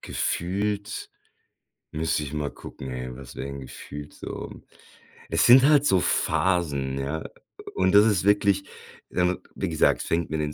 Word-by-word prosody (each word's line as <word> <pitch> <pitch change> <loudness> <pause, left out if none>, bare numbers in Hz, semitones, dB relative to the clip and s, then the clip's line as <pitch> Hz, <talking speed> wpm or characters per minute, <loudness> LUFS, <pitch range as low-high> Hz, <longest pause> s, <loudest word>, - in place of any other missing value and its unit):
gefühlt 100 +4 -2 0.8
müsste 80 -1 -1
ich 70 - -6
mal 75 -2 -2
gucken, 65 -1 -9
ey, 65 0 -5
was 65 -3 -11
wäre - - -5
denn 70 0 -6
gefühlt 70 +3 -9
so? - - -8 0.7
Es - - +2
sind 125 +2 +8
halt 145 0 +5
so 95 - +4
Phasen, 75 -8 0
ja, 75 +4 -3 0.5
und 95 0 +2
das 105 +1 +8
ist 105 -5 +2
wirklich, 100 -1 +3 0.5
dann 90 0 0 0.2
wie - - -2
gesagt, - - +2
fängt 85 0 -1
mit 80 - -2
den 75 -1 -3
85 Hz, 155 wpm, -25 LUFS, 70-100 Hz, 0.8 s, sind